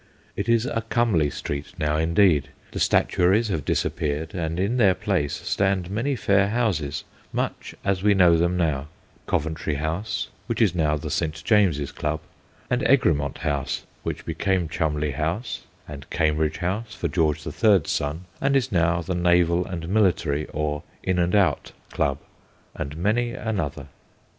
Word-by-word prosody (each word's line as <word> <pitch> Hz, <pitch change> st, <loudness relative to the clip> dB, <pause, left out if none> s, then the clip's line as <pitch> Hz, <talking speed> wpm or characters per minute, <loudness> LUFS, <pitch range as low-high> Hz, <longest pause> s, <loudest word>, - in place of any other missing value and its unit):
It 100 Hz, -, -3 dB
is 115 Hz, 0 st, +3 dB
a 115 Hz, -3 st, -1 dB
comely 110 Hz, -, +2 dB
street 70 Hz, +3 st, -5 dB
now, 75 Hz, -2 st, 0 dB
indeed. 80 Hz, -1 st, +3 dB, 0.2 s
The -, -, -4 dB
statuaries 100 Hz, +6 st, +3 dB
have 80 Hz, -7 st, -1 dB
disappeared, 75 Hz, +1 st, -1 dB
and 85 Hz, -1 st, -2 dB
in 100 Hz, +7 st, +1 dB
their 100 Hz, -6 st, +5 dB
place 70 Hz, -4 st, -1 dB
stand 95 Hz, -2 st, +1 dB
many 125 Hz, +7 st, 0 dB
fair 100 Hz, -4 st, +3 dB
houses, 100 Hz, -, -1 dB, 0.3 s
much -, -, -3 dB
as 95 Hz, -2 st, +1 dB
we 105 Hz, 0 st, +4 dB
know 90 Hz, -3 st, +6 dB
them 85 Hz, +2 st, +1 dB
now 75 Hz, -5 st, 0 dB, 0.4 s
Coventry 80 Hz, -1 st, -1 dB
House, 80 Hz, +9 st, -2 dB, 0.2 s
which 115 Hz, -, -2 dB
is 105 Hz, -7 st, +4 dB
now 75 Hz, -3 st, +1 dB
the 75 Hz, 0 st, -5 dB
St. 80 Hz, 0 st, -2 dB
James's 95 Hz, -11 st, +3 dB
Club; 75 Hz, +1 st, -2 dB, 0.5 s
and 125 Hz, 0 st, 0 dB
Egremont 75 Hz, -, +2 dB
House, 70 Hz, -3 st, -2 dB, 0.2 s
which -, -, -5 dB
be -, -, -3 dB
came 95 Hz, -4 st, 0 dB
Cholmondeley 75 Hz, -2 st, -1 dB
House, 85 Hz, -, -3 dB, 0.2 s
and 70 Hz, -2 st, -9 dB
Cambridge 75 Hz, 0 st, +1 dB
House 105 Hz, +5 st, -3 dB
for -, -, -2 dB
George 80 Hz, -3 st, 0 dB
the 75 Hz, -, -5 dB
Third's 95 Hz, +1 st, +3 dB
son, 75 Hz, +5 st, -2 dB, 0.2 s
and 140 Hz, 0 st, +2 dB
is 130 Hz, -1 st, +1 dB
now 85 Hz, -1 st, +2 dB
the 95 Hz, -, -2 dB
Naval 85 Hz, 0 st, +3 dB
and 85 Hz, -3 st, -5 dB
Military 85 Hz, -7 st, +1 dB
or 75 Hz, -1 st, -2 dB
' -, -, -32 dB
In 90 Hz, -, +1 dB
and 90 Hz, +3 st, +2 dB
Out 100 Hz, -3 st, +2 dB
' -, -, -28 dB
Club, 70 Hz, -1 st, 0 dB, 0.6 s
and 70 Hz, +2 st, -5 dB
many 115 Hz, +7 st, +1 dB
another. 90 Hz, -, -3 dB
85 Hz, 165 wpm, -24 LUFS, 75-100 Hz, 0.6 s, know